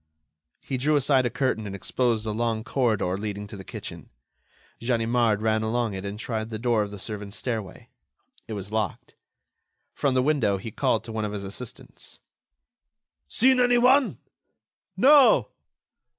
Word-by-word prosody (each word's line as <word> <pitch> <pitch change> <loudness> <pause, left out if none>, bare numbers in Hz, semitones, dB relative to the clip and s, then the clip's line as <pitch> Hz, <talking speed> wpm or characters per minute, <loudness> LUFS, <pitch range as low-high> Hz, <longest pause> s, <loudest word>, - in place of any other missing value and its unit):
He 135 - -3
drew 150 +4 +2
aside 135 -2 +3
a - - -1
curtain 115 -6 -1
and 100 - -5
exposed 115 +2 0
a 110 - -1
long 110 0 -1
corridor 110 -8 0
leading 105 -1 -4
to 105 - -10
the 95 - -9
kitchen. - - -9 0.7
Ganimard 115 -2 +1
ran 110 0 +2
along 115 0 -1
it 95 +1 -5
and 100 +1 -5
tried 110 0 -3
the 110 - -4
door 115 -1 +1
of 105 - -2
the 100 - -8
servants' 105 0 -6
stairway. 110 -7 -5 0.6
It 110 - -5
was 100 -1 -6
locked. 110 -4 -3 0.8
From 140 -3 0
the 130 - +3
window 130 -9 +2
he 110 +4 -7
called 110 - 0
to 115 - -8
one 110 -1 -2
of 105 -1 -3
his 100 -1 -4
assistants: 100 +5 -8 1.1
"Seen 255 - +4
anyone?" 250 +2 +4 0.8
"No." 280 0 +6
110 Hz, 155 wpm, -26 LUFS, 105-130 Hz, 1.1 s, No